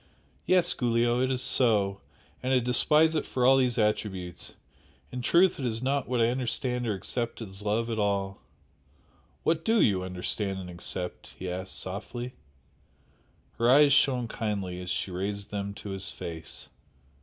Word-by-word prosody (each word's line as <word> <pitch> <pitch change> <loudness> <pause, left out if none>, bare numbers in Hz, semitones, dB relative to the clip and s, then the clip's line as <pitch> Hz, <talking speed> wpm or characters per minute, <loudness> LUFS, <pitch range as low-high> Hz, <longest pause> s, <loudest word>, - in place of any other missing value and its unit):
Yes, 185 -2 +4
Giulio! 120 0 +1
it 130 - +2
is 130 -1 0
so, 105 -7 +3 0.4
and 130 - -1
I 130 - +5
despise 150 +6 +3
it 155 - 0
for 125 -1 -1
all 135 +1 +7
these 125 -2 +2
attributes 100 -5 -1 0.6
in 125 - -4
truth 170 +7 +4
it 135 - -2
is 115 +1 -2
not 140 +1 0
what 125 0 0
I 115 0 +4
understand 125 0 -1
or 105 - 0
accept 115 +5 -3
as 95 -3 -7
love 105 +3 0
at 115 -2 -2
all 100 -1 -1 0.5
" 70 -3 -35
"What 165 0 +1
DO 225 +3 +3
you 95 - +3
understand 95 +2 -2
and 90 -2 -7
accept?" 90 +1 -5
he 95 - -5
asked, 95 +1 -5
softly. 115 +6 -5 1.3
Her 115 +1 +4
eyes 140 +2 +7
shone 130 -4 +3
kindly 100 -6 -3
as 90 - -6
she 90 +2 -2
raised 100 +3 -4
them 100 -1 -3
to 105 - -8
his 95 0 -3
face. 85 -3 -7
115 Hz, 165 wpm, -28 LUFS, 95-125 Hz, 1.3 s, all